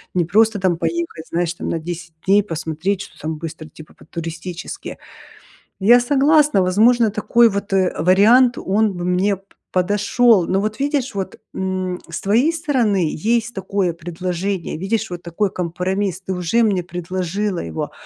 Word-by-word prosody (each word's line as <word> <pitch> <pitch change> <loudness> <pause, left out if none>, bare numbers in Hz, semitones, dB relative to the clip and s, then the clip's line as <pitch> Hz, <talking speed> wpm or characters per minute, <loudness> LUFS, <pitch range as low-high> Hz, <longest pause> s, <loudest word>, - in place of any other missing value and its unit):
Не 175 -2 +2
просто 215 +4 +3
там 185 -2 +2
поехать, 335 - -3
знаешь 170 0 -1
там - - -5
на - - -1
10 170 +1 -7
дней 200 +2 +5
посмотреть, 165 +2 -3
что - - -11
там 155 0 -4
быстро, 160 -1 -7
типа 155 +1 -14
по-туристически. 165 +1 -7 0.8
Я 235 +5 +6
согласна, 285 -2 +3
возможно 220 +5 +4
такой 210 +3 +3
вот, 200 0 -4
э, 190 -2 +2
вариант 220 +9 +5
он 205 +1 +1
бы 175 - -4
мне 185 +2 +1
п 195 - -26 0.3
подошёл. 205 +2 +3
Но 190 +1 +1
вот 215 +1 -3
видишь 280 -2 -1
вот, 190 -2 -5
м, 185 -1 -3
с - - -5
твоей 230 +11 +3
стороны 240 - +1
есть 230 +6 0
такое 195 -3 -1
предложение, 175 +2 -4
видишь 215 +5 -2
вот 175 -1 -6
такой 180 +4 -2
компромисс, 185 +2 -2
ты 190 0 -4
уже 180 +6 +1
мне 195 -5 +1
предложила 180 +2 -3
его, 80 -1 -4
190 Hz, 155 wpm, -20 LUFS, 175-215 Hz, 0.8 s, Я